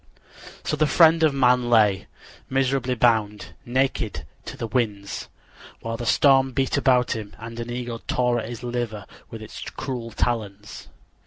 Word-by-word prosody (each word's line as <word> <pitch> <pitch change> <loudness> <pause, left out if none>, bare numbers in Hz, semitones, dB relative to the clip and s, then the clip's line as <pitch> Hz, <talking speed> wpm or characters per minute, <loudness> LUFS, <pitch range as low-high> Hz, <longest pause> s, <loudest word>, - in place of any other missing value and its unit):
So - - -1
the 155 0 +2
friend 165 +2 +5
of 155 -2 +5
man 125 -2 +3
lay, 105 -4 +3 0.4
miserably 130 -1 0
bound, 110 -4 +1
naked 125 -4 -1 0.2
to - - -8
the - - -3
winds, 105 -4 -2 0.5
while 115 0 -4
the 120 0 -5
storms 135 0 +4
beat 135 0 0
about 125 -3 +3
him 105 -2 -7
and 115 +1 -8
an 120 0 -5
eagle 120 -1 -4
tore 125 -1 +1
at 110 - -6
his 120 +1 -7
liver 120 -4 -3 0.2
with 110 -1 -8
its 110 - -9
cruel 125 -4 -5
talons. 105 -3 -3
120 Hz, 155 wpm, -24 LUFS, 110-130 Hz, 0.5 s, friend